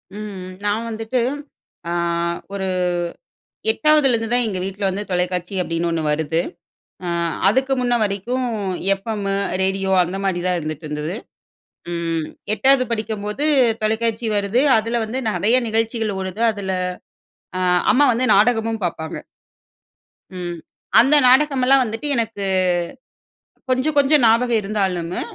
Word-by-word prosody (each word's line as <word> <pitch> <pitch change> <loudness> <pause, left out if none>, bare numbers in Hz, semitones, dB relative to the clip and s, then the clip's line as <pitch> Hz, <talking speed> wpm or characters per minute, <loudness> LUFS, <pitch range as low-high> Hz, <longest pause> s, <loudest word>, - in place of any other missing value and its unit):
ம். 200 -3 -7 0.2
நான் 220 +3 0
வந்துட்டு, 225 +3 -2 1.3
ஒரு 195 -1 -3 1.0
8ஆவது 305 -7 +3
லேருந்து 225 -1 -1
தான் 245 0 +3
எங்க 190 -3 -3
வீட்ல 195 +1 -4
வந்து 200 +2 -3
தொலைக்காட்சி 180 +1 -1
அப்படின்னு 165 0 -2
ஒன்னு 165 -1 -1
வருது. 160 +2 0 0.7
ம் 170 -1 0
அதுக்கு 265 +1 +2
முன்ன 245 -1 +1
வரைக்கும், 220 +6 -2 0.5
எஃப்எம் 200 0 -4 0.3
ரேடியோ 190 0 0
அந்த 180 +2 -4
மாதிரி 180 -2 0
தான் 180 -1 +1
இருந்துட்டு 155 0 -6
இருந்தது. 150 +4 -4 0.8
ம் 165 -2 -2 0.3
8ஆவது 265 +4 +4
படிக்கும்போது 215 +2 -2 0.4
தொலைக்காட்சி 225 +1 0
வருது, 205 +4 +1 0.2
அதுல 230 +2 -1
வந்து 230 +4 -4
நிறைய 220 +3 +2
நிகழ்ச்சிகள் 225 -2 -1
ஓடுது, 190 +2 -5
அ - - +4
அதுல 195 -2 -4 1.2
அம்மா 275 +6 +4
வந்து 245 +3 0
நாடகமும் 225 +1 +2
பார்ப்பாங்க. 160 -2 -4 1.2
ம். 175 -1 -5 0.4
அந்த 270 +6 +5
நாடகமெல்லாம் 270 0 +4
வந்துட்டு 225 +4 -4
எனக்கு 225 -3 -2 1.3
கொஞ்சம் 260 +4 +1
கொஞ்சம் 285 0 +5
ஞாபகம் 230 0 +3
இருந்தாலும் 190 -4 -2
215 Hz, 120 wpm, -20 LUFS, 185-240 Hz, 1.3 s, அந்த